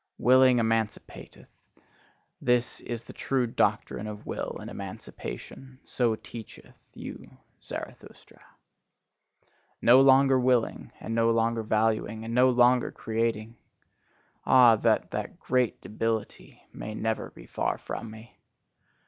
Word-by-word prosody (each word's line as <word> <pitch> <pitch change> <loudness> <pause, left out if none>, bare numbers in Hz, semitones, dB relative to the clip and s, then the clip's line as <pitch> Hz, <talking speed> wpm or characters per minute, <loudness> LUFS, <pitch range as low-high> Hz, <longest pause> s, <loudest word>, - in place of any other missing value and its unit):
Willing 130 +1 +5
emancipateth: 115 -2 -3 1.0
that 125 0 0
is 120 -1 -6
the - - -12
true 130 -2 0
doctrine 110 -2 -1
of 105 -1 -8
will - - -4
and - - -8
emancipation 130 - -8
so 120 -3 0
teacheth 110 0 -11 0.2
you - - -10 0.3
Zarathustra. - - -10 1.4
No 125 +3 +6
longer 135 0 +5
willing, 125 -2 0
and 115 - -5
no 115 0 +2
longer 115 0 +1
valuing, 110 0 0
and 115 - -5
no 125 +2 +5
longer 125 0 +4
creating! 115 0 -3 0.9
Ah, 125 -3 +6
that - - +1
that - - -5
great 125 -2 0
debility 110 0 -4
may 110 0 -7
ever 110 -1 -1
be - - -15
far - - -2
from 115 - -7
me! 110 +2 -14
115 Hz, 115 wpm, -27 LUFS, 110-125 Hz, 1.4 s, No